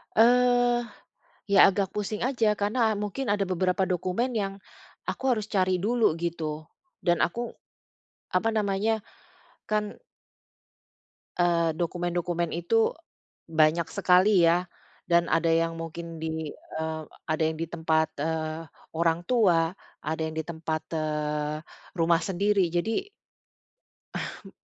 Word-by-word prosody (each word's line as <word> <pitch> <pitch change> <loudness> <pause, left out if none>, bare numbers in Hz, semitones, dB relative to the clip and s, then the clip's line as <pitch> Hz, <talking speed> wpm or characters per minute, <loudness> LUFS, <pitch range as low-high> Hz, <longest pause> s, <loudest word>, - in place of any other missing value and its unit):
Eee, 245 +1 +4 0.6
ya, 200 - +8
agak 195 -1 -1
pusing 210 +1 -3
aja, 235 -4 +2
karena 220 +2 +1
mungkin 210 +3 -2
ada 200 -2 0
beberapa 185 +1 +1
dokumen 185 +8 -1
yang 195 -1 -1 0.6
aku - - -5
harus 215 -1 -4
cari 185 -2 +1
dulu, 230 -4 +3
gitu, 160 -3 -3 0.3
dan 175 -1 +2
aku, 235 +6 -1 0.8
apa 220 +5 +1
namanya, 215 +1 +1 0.7
kan 210 -1 -1 1.4
eee, 170 -2 +3
dokumen-dokumen 175 0 -1
itu 220 - +1 0.5
banyak 160 +1 +3
sekali 185 -1 +4
ya, 175 +2 +3 0.4
dan 170 0 +4
ada 165 0 +3
yang 165 0 +2
mungkin 165 0 -7
di, 160 -1 -3
eee, 160 0 -5 0.2
ada 155 +1 -2
yang 160 - -3
di 165 - -2
tempat, 160 -1 0
eee, 160 0 -2 0.2
orang 165 +1 +1
tua, 180 -9 +3 0.3
ada 160 +1 -2
yang 160 0 -3
di 160 - -2
tempat, 160 -1 -3
eee, 150 -1 -1 0.4
rumah 165 0 +3
sendiri, 195 -1 +1
jadi 220 - -1 1.1
Hmm. - - -6
175 Hz, 120 wpm, -27 LUFS, 160-210 Hz, 1.4 s, ya